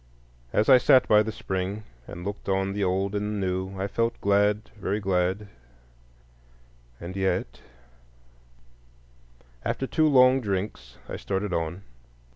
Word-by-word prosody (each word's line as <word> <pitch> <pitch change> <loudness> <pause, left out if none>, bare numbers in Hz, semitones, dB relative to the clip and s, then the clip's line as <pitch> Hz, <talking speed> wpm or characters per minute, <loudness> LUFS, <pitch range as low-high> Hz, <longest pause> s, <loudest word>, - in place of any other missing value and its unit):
As 105 - +2
I 130 -2 +8
sat 130 +1 +5
by 105 -1 +6
the 110 +1 -2
spring 95 +1 -4 0.2
and 85 +1 -8
looked 100 0 -5
on 95 0 0
the 100 0 -1
Old 95 +2 0
and 105 +1 -2
the 100 -2 -1
New 95 +1 -3
I 95 - -1
felt 115 +3 -1
glad, 105 +2 +2
very 100 0 -2
glad, 95 +1 0 1.5
and 85 +2 -7
yet— 95 -10 -1 2.0
After 135 - -2
two 155 +3 +2
long 130 -2 +5
drinks 95 - -4
I - - -5
started 95 -1 -3
on. 85 +3 -3
100 Hz, 135 wpm, -26 LUFS, 95-105 Hz, 2.0 s, I